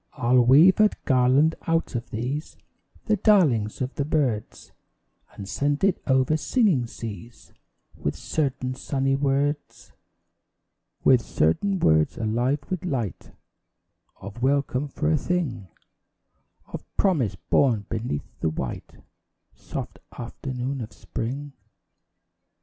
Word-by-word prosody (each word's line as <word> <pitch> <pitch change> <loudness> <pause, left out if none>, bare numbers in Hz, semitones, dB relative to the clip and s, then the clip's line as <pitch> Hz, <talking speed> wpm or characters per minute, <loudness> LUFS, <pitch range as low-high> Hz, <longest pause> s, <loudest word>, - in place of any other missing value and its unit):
I'll 125 +1 +3
weave 150 - +6
a 215 0 +6 0.2
garland 130 +4 +4
out 165 0 0
of 120 0 -4
these, 130 +8 -4 0.5
The 215 - +2
darlings 150 - +3
of 130 +1 -2
the 140 - -1
birds, 140 -8 -2 0.6
And 100 - -8
send 145 - -1
it 195 -2 +2
over 130 +3 +3
singing 170 - +2
seas 115 0 -9 0.4
With - - -3
certain 130 -4 -2
sunny 135 +1 -1
words 140 +1 -1 1.1
With 130 -2 +5
certain 190 - +1
words 80 - +2
alive 120 +6 0
with 185 -3 -3
light 125 - -3 0.9
Of 100 +4 -9
welcome 140 +1 +1
for 155 +3 -1
a 155 - +3
thing 135 - -2 1.0
Of - - -8
promise, 145 - +2
born 105 +4 +1
beneath 110 -9 -3
the 80 - 0
white, 80 - -5 0.6
Soft - - -7 0.2
afternoon 130 +2 -4
of 110 - -7
Spring. 140 +5 -5
130 Hz, 115 wpm, -25 LUFS, 115-150 Hz, 1.1 s, weave